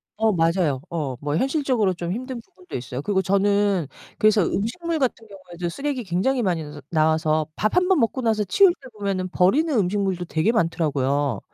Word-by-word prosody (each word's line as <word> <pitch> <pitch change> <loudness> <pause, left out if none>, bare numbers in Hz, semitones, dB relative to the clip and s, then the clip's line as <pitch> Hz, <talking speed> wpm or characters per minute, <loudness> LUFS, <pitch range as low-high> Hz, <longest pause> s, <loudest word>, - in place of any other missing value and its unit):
어 220 0 +2
맞아요. 165 -5 +1
어 150 -6 -3
뭐 145 +1 -2
현실적으로 260 - +1
좀 170 0 -4
힘든 250 +2 -5
부분도 365 - -13
있어요. 125 +2 -5
그리고 190 -2 +1
저는 200 -3 +2 0.3
그래서 215 -2 +4
음식물 330 - -2
같은 230 -4 -1
경우에도 180 -3 -7
쓰레기 275 +3 -3
굉장히 215 +9 0
많이 175 -6 0
너 150 -1 -10
나와서 155 -1 +2
밥 215 - 0
1 360 0 +3
번 375 -6 +3
먹고 240 +3 0
나서 220 -3 +1
치울 350 - +5
때 260 - -12
보면은 190 -2 -2
버리는 270 - +2
음식물도 190 -2 0
되게 160 +7 +1
많더라고요. 145 - 0
195 Hz, 390 characters per minute, -23 LUFS, 165-230 Hz, 0.3 s, 치울